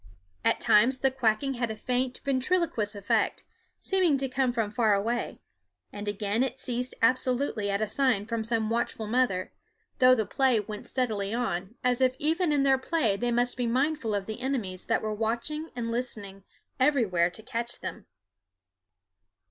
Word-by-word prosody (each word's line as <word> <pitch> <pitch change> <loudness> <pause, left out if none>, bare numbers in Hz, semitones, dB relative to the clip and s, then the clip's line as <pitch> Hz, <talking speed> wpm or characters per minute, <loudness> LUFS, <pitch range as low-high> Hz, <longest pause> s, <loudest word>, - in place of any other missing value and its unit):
At - - +2
times 240 +5 +4
the 270 +1 +2
quacking 260 +1 +1
had 240 -2 -2
a 220 - -4
faint 250 +2 -2
ventriloquous 265 - 0
effect, 200 0 0 0.4
seeming 365 -7 +2
to 270 0 -1
come 260 -1 +1
from 225 -4 -1
far 215 -2 +3
away, 230 +5 -2 0.5
and 205 0 -6
again 205 +2 -1
it 260 -1 -1
ceased 250 -1 -3
absolutely 250 -3 +1
at 200 +2 0
a - - -1
sign 230 -3 +1
from 230 -1 -2
some 225 -1 0
watchful 230 -1 -1
mother, 215 -5 0 0.5
though 255 0 +7
the 220 -3 0
play 260 -2 +2
went 210 0 -7
steadily 220 -5 -1
on, 205 -3 -2
as 250 0 +3
if 255 0 +3
even 320 +3 +1
in 285 -2 +2
their 270 -1 +4
play 260 -8 +1
they 240 +4 -1
must 245 +1 +1
be 245 -1 0
mindful 255 -2 0
of 200 -1 -2
the 220 +3 -6
enemies 230 -9 -3
that - - +1
were 215 0 -1
watching 235 +9 -2
and 230 -2 -3
listening 205 -5 -4 0.3
everywhere 225 - +3
to 220 +5 -12
catch 235 0 -4
them. - - -7
240 Hz, 170 wpm, -28 LUFS, 215-260 Hz, 0.5 s, though